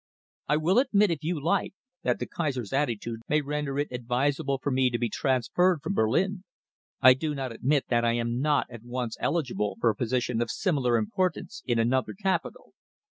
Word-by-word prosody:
I 150 Hz, -, +3 dB
will 175 Hz, +8 st, +3 dB
admit, 210 Hz, -7 st, +3 dB
if 160 Hz, -2 st, -3 dB
you 165 Hz, 0 st, -1 dB
like, 185 Hz, +6 st, 0 dB, 0.3 s
that -, -, +1 dB
the -, -, -3 dB
Kaiser's 135 Hz, -, -3 dB
attitude 120 Hz, -5 st, -1 dB
may 150 Hz, +1 st, +3 dB
render 145 Hz, -1 st, -3 dB
it 145 Hz, +1 st, -1 dB
advisable 135 Hz, +3 st, 0 dB
for 140 Hz, +2 st, -3 dB
me 130 Hz, 0 st, +3 dB
to 120 Hz, -, -1 dB
be 120 Hz, -1 st, -1 dB
transferred 140 Hz, -, +1 dB
from 195 Hz, -, -2 dB
Berlin. 185 Hz, -, +1 dB, 0.6 s
I 130 Hz, 0 st, +9 dB
do 150 Hz, +3 st, -3 dB
not 135 Hz, -2 st, -3 dB
admit 135 Hz, +5 st, +1 dB
that 120 Hz, -1 st, +2 dB
I 115 Hz, 0 st, +2 dB
am 120 Hz, 0 st, -1 dB
not 150 Hz, 0 st, +2 dB
at 120 Hz, -3 st, -9 dB
once 120 Hz, -1 st, -4 dB
eligible 130 Hz, -10 st, -1 dB
for 115 Hz, -1 st, +3 dB
a -, -, -8 dB
position 120 Hz, 0 st, -1 dB
of 120 Hz, -, -1 dB
similar 135 Hz, -, +1 dB
importance 185 Hz, -, -2 dB
in 120 Hz, -2 st, +1 dB
another 120 Hz, +2 st, +1 dB
capital." 190 Hz, -4 st, -2 dB
135 Hz, 190 wpm, -27 LUFS, 120-155 Hz, 0.6 s, I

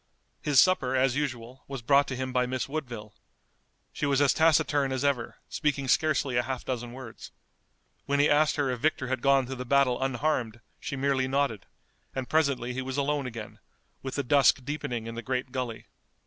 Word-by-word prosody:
His 145 Hz, -3 st, +4 dB
supper, 135 Hz, -9 st, +3 dB
as 130 Hz, -1 st, +2 dB
usual, 130 Hz, -3 st, -4 dB
was 135 Hz, -3 st, -6 dB
brought 140 Hz, +3 st, +4 dB
to 130 Hz, -, -4 dB
him 130 Hz, 0 st, -4 dB
by 125 Hz, 0 st, +2 dB
Miss 130 Hz, 0 st, -2 dB
Woodville. 120 Hz, -8 st, -6 dB, 0.8 s
She 150 Hz, -, -2 dB
was 140 Hz, -1 st, +2 dB
as 140 Hz, -2 st, +4 dB
taciturn 145 Hz, -3 st, +3 dB
as 130 Hz, +1 st, -1 dB
ever, 130 Hz, -5 st, 0 dB
speaking 140 Hz, -3 st, -1 dB
scarcely 140 Hz, -3 st, +2 dB
a -, -, +4 dB
half 130 Hz, 0 st, -5 dB
dozen 120 Hz, -2 st, -4 dB
words. 125 Hz, -2 st, -10 dB, 0.8 s
When 140 Hz, 0 st, +1 dB
he 145 Hz, -, +5 dB
asked 155 Hz, +1 st, +3 dB
her 140 Hz, -3 st, 0 dB
if 125 Hz, -, -3 dB
Victor 135 Hz, -2 st, 0 dB
had 130 Hz, -2 st, -1 dB
gone 135 Hz, -1 st, +4 dB
through 130 Hz, +1 st, -6 dB
the -, -, -2 dB
battle 130 Hz, -1 st, +2 dB
unharmed 130 Hz, -3 st, -1 dB, 0.2 s
she 155 Hz, -3 st, -5 dB
merely 135 Hz, -1 st, +1 dB
nodded, 135 Hz, -6 st, -1 dB, 0.5 s
and 130 Hz, -1 st, -3 dB
presently 140 Hz, -6 st, +1 dB
he 130 Hz, -, -3 dB
was 130 Hz, +1 st, -4 dB
alone 140 Hz, -1 st, 0 dB
again, 115 Hz, -3 st, -8 dB, 0.4 s
with 130 Hz, -1 st, -5 dB
the 140 Hz, -, -1 dB
dusk 135 Hz, -1 st, +4 dB
deepening 125 Hz, -5 st, -3 dB
in 115 Hz, -, -6 dB
the 115 Hz, -, -5 dB
great 130 Hz, 0 st, -3 dB
gully. 125 Hz, -4 st, -4 dB
130 Hz, 190 wpm, -28 LUFS, 125-140 Hz, 0.8 s, he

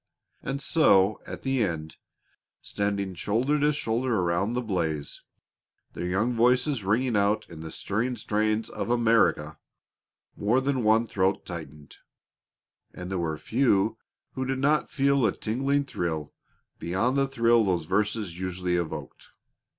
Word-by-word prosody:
And 135 Hz, +1 st, -4 dB
so 105 Hz, -, +4 dB
at -, -, -7 dB
the 135 Hz, -3 st, +1 dB
end, 80 Hz, -5 st, -4 dB, 0.7 s
standing 100 Hz, -2 st, -2 dB
shoulder 120 Hz, -, 0 dB
to 150 Hz, +1 st, +3 dB
shoulder 120 Hz, -3 st, -1 dB
around 90 Hz, +5 st, 0 dB
the 125 Hz, -, -1 dB
blaze, 80 Hz, -8 st, -3 dB, 0.7 s
their 90 Hz, -, -4 dB
young 105 Hz, +7 st, 0 dB
voices 125 Hz, +1 st, +2 dB
ringing 115 Hz, +5 st, +1 dB
out 105 Hz, +1 st, +1 dB
in 80 Hz, -1 st, -9 dB
the 80 Hz, -, -7 dB
stirring 115 Hz, +9 st, -2 dB
strains 110 Hz, +1 st, 0 dB
of -, -, -5 dB
"America," 115 Hz, -2 st, +2 dB, 0.8 s
more 110 Hz, +5 st, +2 dB
than 130 Hz, -2 st, -1 dB
one 110 Hz, +2 st, +4 dB
throat 95 Hz, -2 st, 0 dB
tightened, 75 Hz, -4 st, -9 dB, 1.0 s
and 90 Hz, +1 st, -7 dB
there 95 Hz, -, -1 dB
were 80 Hz, -2 st, -2 dB
few 110 Hz, -, +1 dB, 0.3 s
who 130 Hz, -, -4 dB
did 130 Hz, 0 st, -2 dB
not 145 Hz, +3 st, +1 dB
feel 140 Hz, -2 st, +2 dB
a 110 Hz, -, +1 dB
tingling 135 Hz, +5 st, 0 dB
thrill 80 Hz, -, -3 dB, 0.5 s
beyond 95 Hz, +10 st, 0 dB
the 135 Hz, 0 st, +2 dB
thrill 115 Hz, -3 st, +3 dB
those 90 Hz, -5 st, 0 dB
verses 105 Hz, -2 st, -1 dB
usually 90 Hz, -1 st, -1 dB
evoked. 85 Hz, -2 st, -5 dB
110 Hz, 140 wpm, -27 LUFS, 90-125 Hz, 1.0 s, so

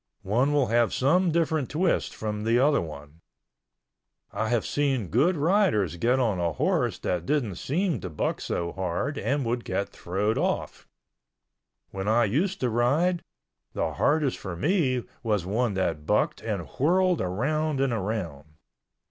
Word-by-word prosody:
One 120 Hz, +9 st, +2 dB
will 145 Hz, -2 st, +3 dB
have 120 Hz, 0 st, +2 dB
some 175 Hz, +8 st, +3 dB
different 160 Hz, -4 st, 0 dB
twist 170 Hz, +4 st, 0 dB
from 105 Hz, -1 st, -4 dB
the 115 Hz, +2 st, +2 dB
other 140 Hz, +3 st, +3 dB
one. 75 Hz, 0 st, -9 dB, 1.1 s
I 110 Hz, +2 st, -1 dB
have 120 Hz, -2 st, +1 dB
seen 135 Hz, -, 0 dB
good 160 Hz, -, +2 dB
riders 150 Hz, -, +2 dB
get 120 Hz, +8 st, +2 dB
on 110 Hz, -8 st, +1 dB
a 85 Hz, -2 st, 0 dB
horse -, -, 0 dB
that 90 Hz, -1 st, -2 dB
didn't 120 Hz, -, 0 dB
seem 170 Hz, -, -1 dB
to -, -, -6 dB
buck 75 Hz, -, -2 dB
so 85 Hz, 0 st, -2 dB
hard 95 Hz, -, -2 dB
and 140 Hz, +3 st, 0 dB
would 120 Hz, +1 st, -1 dB
get 95 Hz, +2 st, -2 dB
throwed 100 Hz, +5 st, -1 dB
off. -, -, -2 dB, 1.0 s
When 95 Hz, 0 st, -4 dB
I 115 Hz, +2 st, +4 dB
used 175 Hz, -, 0 dB
to 125 Hz, -, +1 dB
ride, 150 Hz, +10 st, +2 dB, 0.5 s
the -, -, -1 dB
hardest 150 Hz, -3 st, +1 dB
for 95 Hz, -3 st, -6 dB
me 130 Hz, -, +1 dB, 0.2 s
was 105 Hz, -6 st, 0 dB
one 110 Hz, +2 st, 0 dB
that 80 Hz, -5 st, -2 dB
bucked -, -, +1 dB
and -, -, -3 dB
whirled 180 Hz, +4 st, +3 dB
around 140 Hz, +10 st, -1 dB
and 135 Hz, -3 st, +1 dB
around. 90 Hz, -9 st, -4 dB
120 Hz, 155 wpm, -26 LUFS, 95-150 Hz, 1.1 s, I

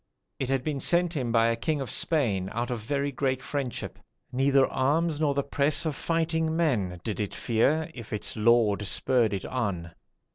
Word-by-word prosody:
It 130 Hz, -, -2 dB
had 135 Hz, -2 st, 0 dB
been 145 Hz, -1 st, -2 dB
sent 175 Hz, +3 st, +2 dB
him 125 Hz, -5 st, -1 dB
by 115 Hz, -1 st, +4 dB
a 115 Hz, -, +1 dB
king 145 Hz, +7 st, -1 dB
of 135 Hz, -5 st, -4 dB
Spain, 105 Hz, -, +1 dB
out 120 Hz, +3 st, -2 dB
of 120 Hz, -, -2 dB
very 140 Hz, +5 st, -2 dB
great 130 Hz, -1 st, -1 dB
friendship. 135 Hz, -2 st, -4 dB, 0.3 s
Neither 135 Hz, +1 st, +3 dB
arms 150 Hz, +5 st, 0 dB
nor 145 Hz, -3 st, +1 dB
the 140 Hz, -, +1 dB
press 140 Hz, +2 st, +1 dB
of 155 Hz, -3 st, -1 dB
fighting 160 Hz, 0 st, 0 dB
men 105 Hz, -, 0 dB
did 110 Hz, -, -3 dB
it 105 Hz, -2 st, -3 dB
fear, 145 Hz, +8 st, +1 dB
if 115 Hz, -3 st, -10 dB
its 105 Hz, -, -2 dB
lord 110 Hz, -2 st, +3 dB
spurred 120 Hz, 0 st, +2 dB
it 95 Hz, -2 st, -3 dB
on. 100 Hz, -9 st, -3 dB
130 Hz, 185 wpm, -27 LUFS, 115-150 Hz, 0.3 s, by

